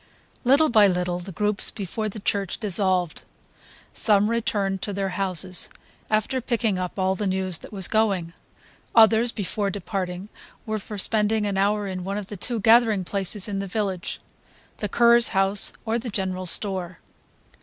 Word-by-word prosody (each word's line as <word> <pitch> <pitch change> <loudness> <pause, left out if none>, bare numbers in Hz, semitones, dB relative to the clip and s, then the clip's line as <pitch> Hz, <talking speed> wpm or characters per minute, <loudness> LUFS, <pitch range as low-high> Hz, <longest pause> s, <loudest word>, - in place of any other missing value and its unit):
Little 280 +5 +4
by 215 -3 +6
little 180 -1 -1
the 185 +2 -8
groups 210 +3 0
before 215 +2 -4
the 215 - -8
church 200 -2 -2
dissolved. 185 -4 +1 0.7
Some 210 0 +2
returned 200 -4 -1
to 205 - -4
their 195 0 -2
houses, 185 -1 0 0.4
after 215 +5 0
picking 230 -5 -1
up 180 +1 -5
all 190 0 +1
the 200 +1 -3
news 185 -2 -1
that - - -12
was 195 -4 0
going; 195 -7 0 0.6
others, 225 +1 +5
before 200 -1 -2
departing, 190 -1 -4 0.4
were 215 -1 -2
for 210 +1 -8
spending 215 +1 +2
an 200 -1 -2
hour 205 +2 +1
in 185 -2 -5
one 195 +2 -3
of 210 - -5
the 210 - -5
two 235 +5 -2
gathering 225 -2 +4
places 195 +2 +1
of 200 -2 -3
the 195 - -4
village; 190 -2 -3 0.6
the 210 - -3
curé's 235 +2 +5
house 195 +1 +3
or 225 +1 0
the 240 +1 -6
general 185 -3 -2
store. 185 -2 +1
200 Hz, 165 wpm, -24 LUFS, 185-215 Hz, 0.7 s, by